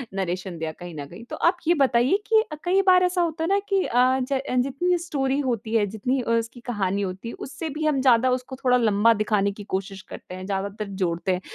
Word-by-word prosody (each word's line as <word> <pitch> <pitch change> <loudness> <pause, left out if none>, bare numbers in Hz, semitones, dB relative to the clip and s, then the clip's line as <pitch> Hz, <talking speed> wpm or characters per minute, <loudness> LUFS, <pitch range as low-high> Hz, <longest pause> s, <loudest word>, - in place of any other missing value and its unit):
Narration 185 -1 -3
दिया 160 0 -3
कहीं 175 +2 -10
न 145 -2 -6
कहीं। 175 +10 -11
तो - - -4
आप 355 - +2
ये 340 - +6
बताइए 260 +5 +3
कि 440 0 +5
अ, - - -3
कई 370 +3 +3
बार 365 -1 +6
ऐसा 360 0 +1
होता 325 -1 -1
है - - 0
ना 395 +1 +3
कि 390 -2 +2
अ, 255 +2 +3
ज 265 +1 -1 0.2
जितनी 350 +7 0
स्टोरी 280 -5 -1
होती 235 -5 -2
है, 215 -2 +4
जितनी 235 +6 -1
अ, 235 - -5
उसकी 230 +1 -1
कहानी 200 -4 -1
होती 190 +3 -4
है, - - -7
उससे 285 +4 -6
भी 310 0 -2
हम 290 -3 +2
ज़्यादा 255 -1 +4
उसको 255 +1 -9
थोड़ा 250 -1 +3
लंबा 225 -1 +4
दिखाने 205 -2 +1
की 205 +1 -10
कोशिश 195 0 -5
करते 180 - -9
हैं, 185 0 -7
ज़्यादातर 200 +2 -3 0.2
जोड़ते 170 +2 -1
हैं। 180 - -3
235 Hz, 235 wpm, -24 LUFS, 195-280 Hz, 0.2 s, ये